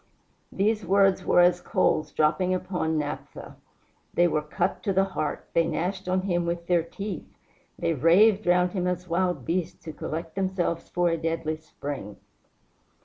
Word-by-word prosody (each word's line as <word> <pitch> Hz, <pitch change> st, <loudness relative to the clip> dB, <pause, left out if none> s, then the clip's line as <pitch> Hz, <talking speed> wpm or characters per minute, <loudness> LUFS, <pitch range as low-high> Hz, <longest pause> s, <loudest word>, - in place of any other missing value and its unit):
These 210 Hz, +2 st, +1 dB
words 195 Hz, -1 st, +3 dB
were 175 Hz, -, +4 dB
as 175 Hz, 0 st, +4 dB
coals 155 Hz, -3 st, +1 dB
dropping 180 Hz, +4 st, +2 dB
upon 175 Hz, -4 st, -2 dB
naphtha. 145 Hz, -1 st, -5 dB, 0.6 s
They 175 Hz, -, +5 dB
were 155 Hz, -2 st, 0 dB
cut 150 Hz, -, -2 dB
to 200 Hz, -, -1 dB
the 190 Hz, +1 st, +4 dB
heart; 185 Hz, -6 st, -3 dB
they 165 Hz, -1 st, +3 dB
gnashed 185 Hz, +2 st, -2 dB
on 185 Hz, 0 st, +2 dB
him 175 Hz, -2 st, 0 dB
with 170 Hz, 0 st, -2 dB
their 175 Hz, -1 st, +3 dB
teeth; 185 Hz, +2 st, -6 dB, 0.5 s
they 165 Hz, -, 0 dB
raved 185 Hz, -, +4 dB
round 180 Hz, 0 st, +3 dB
him 180 Hz, -2 st, -1 dB
as 180 Hz, 0 st, -2 dB
wild 175 Hz, -5 st, 0 dB
beasts 175 Hz, 0 st, -2 dB
who 160 Hz, -, -6 dB
collect 160 Hz, +2 st, -5 dB
themselves 185 Hz, -3 st, -2 dB
for 175 Hz, -1 st, +1 dB
a 165 Hz, -, 0 dB
deadly 160 Hz, -1 st, -2 dB
spring. 140 Hz, -8 st, -7 dB
175 Hz, 160 wpm, -26 LUFS, 160-185 Hz, 0.6 s, They